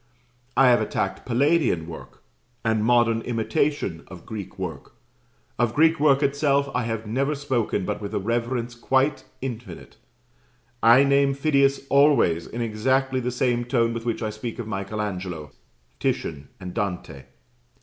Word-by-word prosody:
I 135 -1 +7
have 120 -2 +4
attacked 95 -2 -2
Palladian 130 - +2
work, 80 -1 -11 0.4
and 110 -1 +2
modern 115 -1 +3
imitation 120 - -1
of 90 -3 -12
Greek 105 -4 -7
work. - - -6 0.7
Of 120 -1 +1
Greek 160 +2 +4
work 145 -1 +4
itself 140 0 +1
I 125 -2 0
have 115 -1 -3
never 135 +7 0
spoken 130 -9 -1
but - - -3
with 100 - -5
a - - +1
reverence 120 +3 -2
quite 130 +3 +1 0.2
infinite: 115 -9 -7 0.8
I 120 +4 +7
name 140 0 +3
Phidias 140 -1 +2
always 140 - +4
in 120 - -5
exactly 130 +4 +1
the 125 0 -2
same 125 -1 0
tone 115 -1 +1
with 115 0 -5
which 115 -1 -2
I 110 - -2
speak 110 +2 -6
of 120 - -5
Michael 105 0 -3
Angelo, 90 -7 -5 0.5
Titian, 70 -3 -2
and 90 -1 -7
Dante. 90 - -4
120 Hz, 150 wpm, -24 LUFS, 105-135 Hz, 0.8 s, I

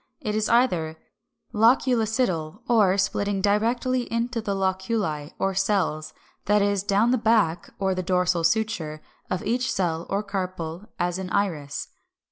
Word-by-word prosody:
It 210 - -3
is 215 0 0
either 180 -10 +2 0.6
Loculicidal, 225 - +2
or, 205 -5 +4
splitting 200 +1 0
directly 235 +5 +1
into 230 +1 -1
the 200 -2 -2
loculi 190 -5 -1
or 195 0 0
cells, 190 -5 0 0.3
that 205 0 +3
is, 200 -1 +1
down 205 +4 +2
the 255 - +2
back 215 -7 +2
(or 190 -1 0
the 185 - -2
dorsal 180 -2 +1
suture) 165 -6 0 0.3
of 185 - -2
each 245 +4 0
cell 170 -3 -1
or 200 +2 0
carpel, 185 -2 -4
as 175 +1 -1
in 185 -1 -5
Iris 160 -9 -2
(Fig. - - -41
195 Hz, 145 wpm, -25 LUFS, 180-220 Hz, 0.6 s, or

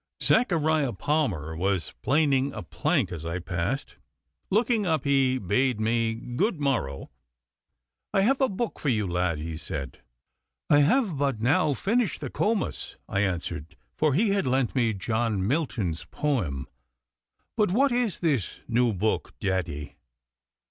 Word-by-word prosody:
Zachariah 160 - +3
Palmer 95 - -1
was 95 +1 -1
planing 140 -1 +2
a 110 - -6
plank 80 - 0
as 80 -3 -6
I 85 +1 -3
passed. 90 +9 -3 0.5
Looking 220 +1 +2
up 160 -6 +1
he 135 -2 +3
bade 125 +3 +1
me 115 +1 +1
good 150 - -1
morrow. 115 - -1 1.0
'I 195 - +3
have 265 +7 +2
a 265 - +4
book 215 +3 -3
for 145 - 0
you, 110 -5 +1
lad,' 90 -2 0
he 80 +1 -5
said. 70 -5 -6 0.7
'I 145 - +7
have 190 - +3
but 135 -5 0
now 140 +5 +2
finished 220 - 0
the 140 -5 -5
"Comus,"' 215 -1 -1
I 95 - -1
answered, 85 -5 -2 0.2
for 155 -3 +2
he 210 +6 +3
had 195 -8 +1
lent 130 -1 +1
me 115 -5 +1
John 110 -1 -1
Milton's 110 - -1
poem. 95 - -2 0.9
'But 210 -3 +2
what 275 +8 +3
is 240 -5 0
this 145 - 0
new 120 -1 +2
book, 105 +3 -1
daddy? 90 -7 -2
130 Hz, 140 wpm, -27 LUFS, 95-155 Hz, 1.0 s, I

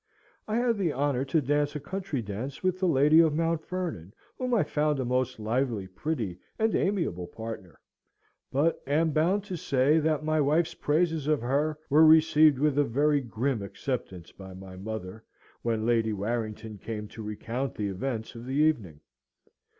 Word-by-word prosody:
I 215 - -1
had 235 -2 +1
the 175 -5 +1
honour 135 -1 0
to 150 +3 +1
dance 145 +2 0
a - - -2
country 185 -6 -4
dance 110 - -6
with 185 0 +1
the 185 - +2
lady 150 +1 +5
of 160 -3 +4
Mount 165 0 0
Vernon, 165 - -4 0.2
whom 255 -1 -3
I 230 -7 +3
found 150 -1 0
a 130 - -1
most 125 0 -1
lively, 115 -1 -1
pretty, 100 - -4 0.2
and 220 0 +1
amiable 165 - 0
partner; 110 -6 -8 0.7
but 150 +5 +1
am 155 +3 +2
bound 175 +7 +2
to 190 -3 -5
say 145 0 +2
that 155 -1 0
my 155 0 +1
wife's 155 +4 +2
praises 160 -1 0
of 155 -2 +2
her 145 +5 0
were 150 +3 +5
received 155 -2 +6
with 145 +1 +2
a - - +5
very 145 +3 +2
grim 120 0 -2
acceptance 100 - -5
by 95 -1 -11
my 95 0 -10
mother, 105 +1 -6 0.4
when 115 -2 -1
Lady 115 -2 +2
Warrington 110 0 -4
came 105 -1 -5
to 110 - -9
recount 115 +5 -4
the 105 -1 -2
events 110 +3 -4
of 115 +1 -9
the 130 - -3
evening. 115 - +1
135 Hz, 175 wpm, -28 LUFS, 110-155 Hz, 0.7 s, received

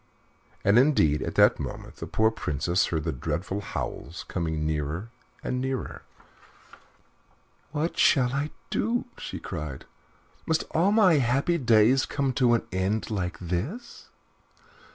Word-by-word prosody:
And, 100 +4 +5
indeed, 80 - +3
at - - -4
that - - +5
moment - - -7
the - - -6
poor 110 0 +2
Princess 85 -3 0
heard 80 -3 -2
their - - -2
dreadful 95 +9 -3
howls 80 -4 -5
coming 80 -3 -2
nearer 80 +7 -2 0.3
and 125 0 -2
nearer. 130 -1 -3 1.7
"What 155 +3 -2
shall 125 -2 +4
I 145 +2 -1 0.2
do?" 235 +2 0
she - - -5
cried. 75 -6 -6 0.6
"Must 160 0 +1
all 175 +5 +3
my 190 -8 +5
happy 135 +7 +1
days 120 +1 +4
come 140 -2 -1
to 120 -2 +4
an 115 - -2
end 95 +5 -1
like 90 -4 -2
this?" 100 - -5
110 Hz, 130 wpm, -27 LUFS, 85-140 Hz, 1.7 s, And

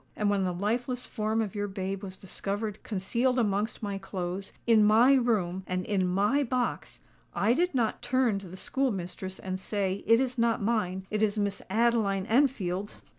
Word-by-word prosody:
And 210 -1 +1
when 195 -2 +1
the 180 - 0
lifeless 240 +7 -2
form 220 0 -1
of 205 - -5
your 205 0 -2
babe 195 0 -4
was 190 -2 -7
discovered 205 +2 -4
concealed 235 +6 0
amongst 215 0 0
my 200 -1 -3
clothes—in 195 +4 0
my 225 +6 +6
room—and 185 -7 0
in 195 -3 +1
my 205 +10 +2
box,—I 245 -3 -2
did 350 +3 +1
not 230 -4 0
turn 245 -5 +1
to 195 - -10
the 185 +2 -9
school 270 +7 0
mistress 190 -1 -5
and 185 0 -4
say, 195 -1 -2
'_It 230 +1 +6
is 255 -2 -1
not 230 -1 +2
mine: 200 -4 -1
it 215 0 0
is 215 -1 +2
Miss 200 -1 -1
Adeline 215 -3 +2
Enfield's! 210 -6 0
205 Hz, 170 wpm, -29 LUFS, 190-235 Hz, -, my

